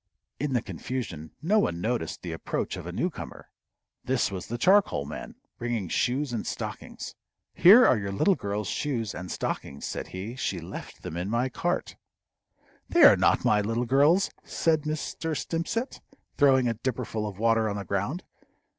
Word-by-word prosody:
In 140 0 -1
the 120 - +1
confusion 90 - -5
no 210 +6 +4
one 85 - 0
noticed 110 -3 -2
the 85 - -4
approach 80 - -3
of - - -7
a - - -4
newcomer. - - -4 0.5
This 130 -4 +1
was 95 -2 -5
the 120 - -3
charcoal 185 - +4
man, 75 - -7 0.2
bringing 120 -6 -2
shoes 130 - 0
and 115 - -3
stockings. - - -6 0.4
"Here 220 +8 +8
are 120 - +4
your 100 -1 -3
little 145 - +3
girl's 100 - -3
shoes 115 -7 -2
and 90 0 -7
stockings," 70 - -4
said - - -4
he. 100 +6 -6
"She 100 -8 -2
left 85 - -9
them 80 - -5
in 90 +3 -3
my 120 +4 +1
cart." - - -2 0.9
"They - - +5
are - - +10
not - - +2
my 105 -1 +4
little 115 +4 -1
girl's," 145 +10 +4
said 160 -2 +1
Mr. 155 +1 -3
Stimpcett, 200 +10 -3 0.3
throwing 135 -3 +4
a 115 - +1
dipperful 115 -2 -3
of 100 -3 -7
water 115 0 +2
on 100 - -3
the 100 -1 -5
ground. 100 - -2
120 Hz, 170 wpm, -27 LUFS, 100-145 Hz, 0.9 s, are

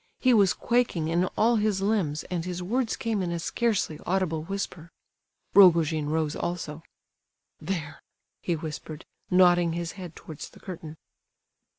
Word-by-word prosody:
He 255 -1 +4
was 200 -5 +5
quaking 235 -10 0
in 170 +2 +2
all 230 +2 +4
his 210 -2 +1
limbs, 195 -7 0
and 175 -2 -1
his 180 0 -4
words 230 +5 0
came 225 -3 -1
in 175 -2 -2
a 170 - -1
scarcely 195 -3 -1
audible 180 -4 0
whisper. 170 -2 -5 0.6
Rogojin 165 -5 +5
rose 155 -1 0
also. 165 -3 -4 0.8
"There," 165 -7 -4 0.4
he 175 - 0
whispered, 155 0 -7 0.2
nodding 175 -2 +5
his 170 0 -3
head 180 -5 -9
towards 155 -3 -9
the - - -17
curtain. 165 -4 -8
175 Hz, 145 wpm, -27 LUFS, 160-195 Hz, 0.8 s, was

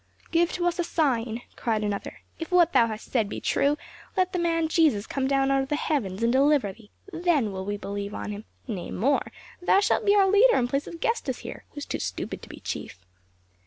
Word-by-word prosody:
"Give 340 0 +3
to 350 - -1
us 350 0 0
a - - +3
sign!" 245 -9 0
cried 220 -2 -1
another. 205 -1 -4 0.2
"If 325 - -5
what 350 -1 +5
thou 230 - +5
hast 215 -1 -7
said 225 -5 +1
be - - -4
true, 285 +1 +1 0.4
let 370 -1 +2
the 360 - 0
man 330 -1 +1
Jesus 310 -11 +3
come 265 -1 -1
down 270 0 +2
out 270 0 +3
of 270 - -4
the 295 - +1
heavens 230 -10 -1
and 235 +1 +3
deliver 275 -6 +3
thee, 215 -1 -18 0.2
then 330 - +1
will 190 0 -5
we 205 +1 -2
believe 200 0 -5
on - - -4
him; 210 +1 -7 0.2
nay, 200 -7 -4
more, 275 +8 0 0.3
thou 370 - +4
shalt 415 +2 +2
be 405 -1 +4
our 395 -1 +5
leader 430 +5 +6
in 245 - +2
place 275 +3 -1
of 335 -1 -9
Gestas 460 +1 -1
here - - -8
who - - -24
is 290 - -4
too - - -3
stupid - - -4
to - - -12
be - - -10
chief." 90 0 -6
275 Hz, 230 wpm, -26 LUFS, 215-335 Hz, 0.4 s, leader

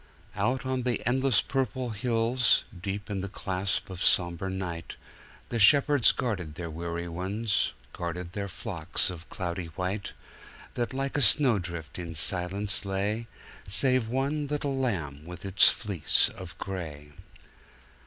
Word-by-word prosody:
Out 130 +1 0
on 130 -1 0
the 120 -3 -1
endless 130 -3 +3
purple 130 -2 -1
hills, 115 +1 +2 0.2
deep 100 +2 -3
in 95 -2 -2
the 100 - -4
clasp 95 0 -1
of 95 -1 -6
somber 90 +1 +3
night, 90 -3 -4 0.5
The 120 - -1
shepherds 140 +3 +6
guarded 90 -11 -3
their 85 -1 -5
weary 85 +1 -4
ones 100 +6 -1 0.2
guarded 85 0 -4
their 100 -1 -3
flocks 90 -2 -2
of 85 -2 -10
cloudy 85 -1 -3
white, 95 +2 -2 0.6
That 120 -1 -2
like 135 +1 -1
a - - +2
snowdrift 95 - +3
in 85 -2 -6
silence 95 +6 +1
lay, 100 +4 -1 0.4
Save 130 +3 +2
one 140 +5 -1
little 145 -1 -1
lamb 85 - -2
with 85 +1 -9
its 95 0 +6
fleece 100 -7 +2
of 90 -2 -10
gray. 80 -6 -6
100 Hz, 135 wpm, -28 LUFS, 85-120 Hz, 0.6 s, shepherds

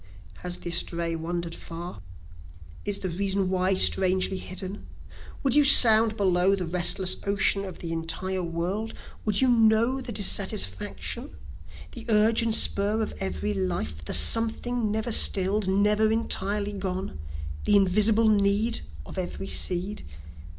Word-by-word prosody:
"Has 180 0 -4
the 175 - -7
estray 170 0 -1
wander'd 170 +1 -5
far? 170 - -9 0.8
Is 205 -1 0
the 190 - -5
reason 195 +1 -2
why 185 +1 0
strangely 185 0 +2
hidden? 190 +2 -8 0.6
Would 270 -3 0
you 295 +1 +5
sound 225 -5 +7
below 185 0 +2
the 185 -2 -5
restless 180 +2 0
ocean 200 0 +1
of 185 -3 -9
the 165 - -7
entire 180 +3 -3
world? 180 +6 -4 0.3
Would 210 0 +1
you 260 - +3
know 230 +2 +2
the 250 - -7
dissatisfaction? 195 - -3 0.6
the 225 - -9
urge 220 +2 +3
and 225 -1 0
spur 205 +2 +3
of - - -6
every 95 +2 -3
life; 85 -5 -4
The 75 - +1
something 225 - +2
never 220 +2 -3
still'd 200 -1 +2
never 210 +3 +1
entirely 205 -2 -1
gone? 190 - -5 0.5
the 205 - +2
invisible 210 +3 +3
need 210 +2 +1 0.3
of - - -8
every 185 +1 -6
seed? 185 +3 -2
195 Hz, 135 wpm, -25 LUFS, 180-215 Hz, 0.8 s, sound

